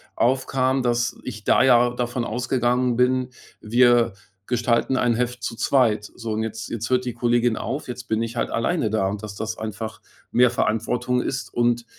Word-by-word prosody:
aufkam, 130 +1 +1
dass 120 0 0
ich 110 -4 -7
da - - +4
ja 120 -2 +5
davon 120 0 -2
ausgegangen 125 +1 0
bin, 125 +1 +2 0.3
wir 120 0 +3 0.3
gestalten 120 +2 +1
ein 120 -2 +2
Heft 125 -1 -2
zu 115 - -3
zweit. 110 -5 +2
So 115 -2 -5
und 110 +1 -1
jetzt 110 0 -5
jetzt 115 -1 -4
hört 125 0 +1
die 125 - -3
Kollegin 120 0 +1
auf, 145 +3 -4
jetzt 125 -1 -6
bin 110 -2 -1
ich 115 +1 -5
halt - - -1
alleine 115 +1 0
da. 105 -2 +1
Und 100 +1 -4
dass 105 -2 -7
das 110 +2 -4
einfach 110 0 -6 0.3
mehr 125 0 +5
Verantwortung 125 +2 0
ist 130 -4 -4
und 120 0 +1
120 Hz, 180 wpm, -23 LUFS, 110-125 Hz, 0.3 s, ja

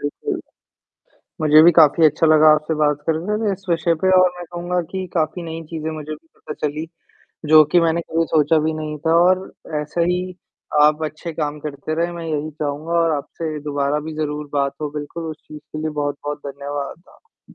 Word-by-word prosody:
बिल्कुल। 145 0 -3 1.0
मुझे 155 0 +7
भी 175 - +8
काफ़ी 160 +2 +6
अच्छा 155 +2 +3
लगा 155 0 +6
आपसे 155 +1 0
बात 150 -1 +2
करने 165 +6 0
में 205 - +1
इस 195 0 -7
विषय 170 0 +2
पे 185 - +4
और 185 0 +5
मैं 175 - -6
कहूँगा 175 +1 -2
कि 190 -1 -3
काफ़ी 165 +1 -1
नई 165 0 -6
चीज़ें 160 -1 -4
मुझे 155 -1 -7
भी 160 +2 -13
पता 150 - -8
चली, 150 +2 -5 0.6
जो 155 0 +8
कि 175 - +6
मैंने 165 0 +2
कभी 165 +1 +2
सोचा 155 +1 +4
भी 160 - +1
नहीं 155 -1 -4
था 165 - +4
और 185 +1 +3 0.4
ऐसे 160 +3 -1
ही, 180 +1 -1 0.5
आप 150 +1 +4
अच्छे 155 +2 -5
काम 150 -1 -3
करते 150 +1 -5
रहें। 170 +2 -1
मैं 170 -1 -7
यही 155 0 -2
चाहूँगा 150 +2 -4
और 165 -1 +2
आपसे 155 +2 -5
दोबारा 145 0 -1
भी 160 - -6
ज़रूर 150 -1 -3
बात 140 -1 0
हो, 150 -1 -3
बिल्कुल 150 +3 -6
उस 155 - -8
चीज़ 150 0 -9
के 155 - -9
लिए 155 0 -2
बहुत-बहुत 145 0 -3
धन्यवाद 140 +3 -6
आ 460 - -25
155 Hz, 200 wpm, -20 LUFS, 150-170 Hz, 1.0 s, भी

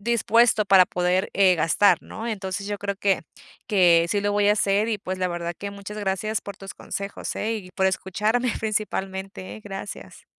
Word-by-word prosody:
dispuesto 230 0 +3
para 190 -2 +6
poder, 180 +2 0
eh, 190 -2 +5
gastar, 165 +5 +4
¿no? 225 - -7
Entonces, 200 -2 -4
yo 205 0 -3
creo 200 0 -3
que, 195 -1 +1 0.4
que 175 -4 +4
sí 205 +3 +1
lo 205 0 0
voy 205 0 +3
a - - +6
hacer. 205 +1 +1
Y 220 -2 -1
pues, 185 -1 -5
la 185 0 0
verdad 175 0 -4
que 200 - -5
muchas 200 +1 -8
gracias 205 +2 -1
por 200 - -9
tus 195 -1 -9
consejos, 200 0 -5
eh, 225 +2 -1
y 185 -4 -9
por 190 - +2
escucharme 210 +6 0
principalmente, 195 -3 -3
eh, - - -12
gracias. 195 - -8
200 Hz, 190 wpm, -24 LUFS, 190-210 Hz, 0.4 s, para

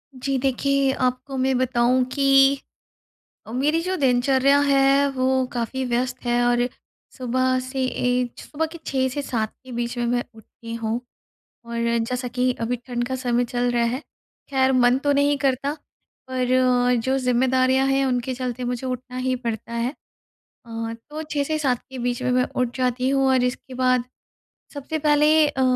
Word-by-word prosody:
जी। 270 +1 -1
देखिए, 275 +1 +1
आपको 255 +1 -2
मैं 260 0 +1
बताऊँ 255 0 +2
कि 275 0 +5 0.9
अ, 225 - -9
मेरी 295 +6 +1
जो 370 +1 -1
दिनचर्या 265 +1 +3
है 275 0 +4
वो 260 0 +1
काफ़ी 250 +2 -2
व्यस्त 250 +1 -2
है 240 0 +2
और 245 0 +2 0.5
सुबह 255 0 +1
से 260 +1 -3
ऐज 250 -1 -1
सुबह 320 +2 -3
के 335 - -8
6 260 -1 +1
से 285 +3 -4
7 225 -5 -2
के 260 - -10
बीच 240 +1 -3
में 240 - 0
मैं 245 0 0
उठती 230 +1 -10
हूँ। 230 +1 -2 0.7
और 235 0 -4 0.3
जैसा 250 0 -2
कि 250 +1 +1
अभी 235 +2 0
ठंड 240 -1 -2
का 260 - -2
समय 245 -1 0
चल 245 +1 -1
रहा 240 -1 +1
है 240 +3 -1 0.5
ख़ैर 265 -1 +2
मन 250 0 +4
तो 285 0 +1
नहीं 285 0 +2
करता 275 +1 0 0.6
पर 255 -1 -1 0.6
जो 265 +2 +1
ज़िम्मेदारियाँ 260 +1 +2
हैं 270 0 +2
उनके 250 0 -1
चलते 250 -1 -4
मुझे 245 +1 -3
उठना 255 0 -5
ही 255 0 0
पड़ता 235 -1 -5
है। 235 +2 -1 0.7
अ, 230 0 -5 0.2
तो 310 +1 -5
6 295 -2 -1
से 310 +2 -1
7 255 -5 +1
के 265 - -8
बीच 245 0 -2
में 250 - +1
मैं 250 0 +3
उठ 250 0 -1
जाती 255 0 0
हूँ 270 -1 +2
और 260 -1 +3
इसके 250 +1 -3
बाद 255 -1 +2 0.7
सबसे 290 +3 -4
पहले 300 +1 +4
अ, 275 -3 -1
255 Hz, 170 wpm, -23 LUFS, 245-270 Hz, 0.9 s, कि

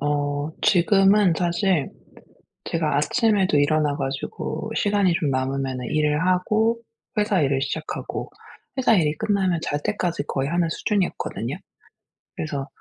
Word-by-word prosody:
어 145 0 -1
지금은 195 +1 +4
사실 175 -3 +1 0.7
제가 160 -3 -1
아침에도 195 0 +2
일어나 145 0 +2
가지고 135 +10 -4
시간이 200 -3 +2
좀 155 -4 0
남으면은 130 -1 -2
일을 150 +2 +1
하고 215 +5 +2 0.4
회사 210 -4 +2
일을 135 -1 +1
시작하고 155 +3 -4 0.5
회사 245 -3 +4
일이 155 -6 +2
끝나면 195 -5 +1
잘 145 -2 -2
때까지 175 -7 -1
거의 135 +1 -1
하는 170 -1 +1
수준이었거든요. 195 +2 -2 0.8
그래서 145 -3 -4
165 Hz, 295 characters per minute, -23 LUFS, 145-195 Hz, 0.8 s, 지금은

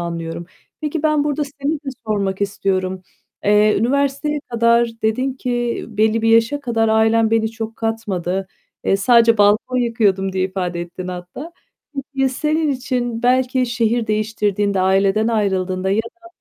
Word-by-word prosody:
anlıyorum. 170 0 -5 0.3
Peki 305 0 -3
ben 305 -2 +2
burada 295 0 -1
seni 280 +1 -3
de 290 -2 -7 0.2
sormak 200 -2 -1
istiyorum. 190 -2 -1 0.4
Eee, 210 +1 +4
üniversiteye 280 +4 0
kadar 235 0 +3
dedin 255 +5 0
ki 240 -2 -2
"Belli 220 +1 +1
bir 225 - +2
yaşa 230 +5 +3
kadar 230 -4 0
ailem 220 0 +3
beni 220 -1 +1
çok 225 0 -6
katmadı. 195 -5 -2 0.4
Eee, 195 - +3
sadece 230 +1 +4
balkon 210 +5 +3
yıkıyordum." 210 -6 +1
diye 185 0 0
ifade 180 -2 -3
ettin 175 +1 -7
hatta. 180 - -8 0.4
Peki 275 -1 -4 0.2
ya, 270 - +4
senin 305 +3 0
için 250 -3 -2
belki 255 +1 +2
şehir 235 -1 0
değiştirdiğinde, 210 -2 0
aileden 195 +3 +2
ayrıldığında 190 -4 0
ya 200 - +1
da 345 +9 -14
225 Hz, 145 wpm, -19 LUFS, 195-250 Hz, 0.4 s, Eee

